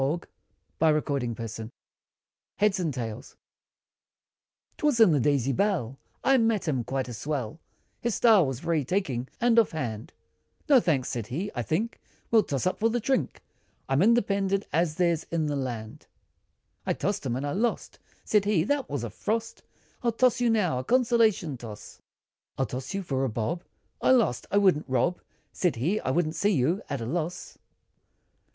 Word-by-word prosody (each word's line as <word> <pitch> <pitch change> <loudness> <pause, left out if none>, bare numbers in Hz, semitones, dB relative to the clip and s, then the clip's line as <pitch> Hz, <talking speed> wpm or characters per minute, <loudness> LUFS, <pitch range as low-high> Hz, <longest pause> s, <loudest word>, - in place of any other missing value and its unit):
[Illustration: 120 -8 0 0.8
HEADS 205 -2 +2
AND 165 -4 0
TAILS] 115 -3 -6 1.4
TWAS 295 -5 +2
in 220 -6 +7
the 150 - +3
Daisy 135 0 +2
Bell, 135 - 0 0.2
I 265 0 +4
met 225 -5 +1
him, 130 -6 0
quite 135 +2 -2
a 120 - -6
swell, 140 +3 -4 0.4
His 235 -2 -1
style, 215 - +5
was 130 0 -4
very 165 -3 0
taking, 130 -7 -1
and 235 -1 +4
off 225 - +2
hand, 115 -8 -4 0.6
"No 280 -4 +7
thanks!" 145 - 0
said 115 -5 -4
he 180 +11 -3
"I 120 - -2
think 190 - -2 0.3
We'll 225 -1 +6
toss 140 -6 -3
up, 185 - 0
for 225 - +3
the 240 +1 0
drink, 265 +3 -1 0.4
I'm 135 +3 +2
independent, 200 -2 +2
as 165 -1 +1
there's 170 -2 +1
in 165 -2 -1
the 145 -1 -1
land!" 120 -5 -5 0.8
I - - 0
tossed 200 +1 -2
him, 125 -3 -1
and 135 +3 -3
I 145 - -2
lost, 230 +7 -2 0.3
Said 210 -2 +2
he 200 -6 +2
"That 285 +6 -1
was 140 -4 -3
a 115 - -4
frost, 225 - -3 0.4
I'll 235 - +1
toss 245 +1 +2
you 240 - +3
now, 185 - +1
a - - -4
consolation 225 - +2
toss, 110 -3 -10 0.6
I'll 135 - +1
toss 130 +8 -5
you, 195 - -2
for 135 -6 -1
a 135 - +1
bob" 120 +11 -3 0.4
I - - +2
lost! 235 - +3
"I 200 - +1
wouldn't 185 -8 +3
rob" 130 +8 +1 0.3
Said 180 -3 0
he 165 - 0
"I - - -3
wouldn't 155 +3 +1
see 185 +6 +1
you, 175 - +1
at 140 -4 -3
a - - -3
loss. 165 +6 -4
160 Hz, 170 wpm, -27 LUFS, 130-210 Hz, 1.4 s, in